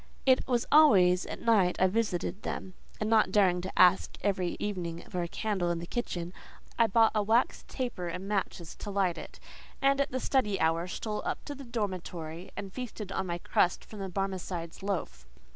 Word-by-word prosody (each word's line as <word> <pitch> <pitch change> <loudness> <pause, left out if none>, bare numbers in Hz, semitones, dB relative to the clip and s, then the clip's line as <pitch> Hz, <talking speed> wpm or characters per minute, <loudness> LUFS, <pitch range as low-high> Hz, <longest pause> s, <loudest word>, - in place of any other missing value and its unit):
It 260 -1 +4
was 245 -2 +1
always 185 -13 +6
at - - -7
night 200 -6 +4
I 185 - +5
visited 195 -1 -1
them, 185 - -5 0.3
and 215 - -1
not 220 -3 +4
daring 185 -3 +3
to 185 - -6
ask 180 +1 +5
every 185 -3 0
evening 175 -5 -3
for 180 - -1
a 170 - -2
candle 190 -2 -1
in 170 - 0
the 170 - -5
kitchen, 175 -5 -4 0.5
I 230 - +6
bought 225 +1 +4
a 215 - +2
wax 225 +4 +1
taper 240 -9 -4
and 180 +3 -5
matches 190 -4 -3
to 210 - -7
light 195 -4 0
it, - - -10 0.4
and 275 0 +3
at 280 - 0
the 255 - -2
study 210 -8 +1
hour 165 +2 +1
stole 210 +3 -4
up - - -3
to 290 - -5
the 275 -1 -10
dormitory 185 -7 -4
and 195 -1 -6
feasted 225 -6 -6
on 190 - -2
my 170 0 -2
crust 175 +1 +1
from 215 - -10
the 195 -1 -4
Barmecide's 185 -3 -4
loaf. 160 - -4
195 Hz, 195 wpm, -30 LUFS, 175-220 Hz, 0.5 s, always